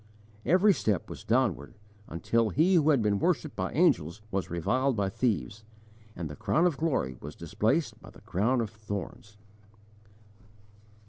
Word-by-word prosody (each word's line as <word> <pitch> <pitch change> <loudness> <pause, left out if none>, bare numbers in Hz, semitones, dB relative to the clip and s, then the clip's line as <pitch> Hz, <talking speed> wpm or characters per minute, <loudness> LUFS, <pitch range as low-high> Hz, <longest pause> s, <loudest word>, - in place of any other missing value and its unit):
Every 190 +4 +5
step 105 - -1
was - - -9
downward 110 - 0 0.3
until 110 +7 0
He 160 - +3
who 155 -4 +4
had 135 -7 +3
been 100 -1 +1
worshipped - - 0
by - - -2
angels 85 +7 +2
was 95 -1 -2
reviled 130 +11 0
by 100 -2 0
thieves, 110 0 -2 0.5
and 85 -2 -4
the 75 - -8
crown 165 - +1
of 175 -5 +2
glory 130 - -1
was 75 +2 -8
displaced 110 - -1
by - - -13
the - - -16
crown 120 +7 0
of 110 -3 -4
thorns! 105 -1 -7
110 Hz, 150 wpm, -28 LUFS, 95-135 Hz, 0.5 s, Every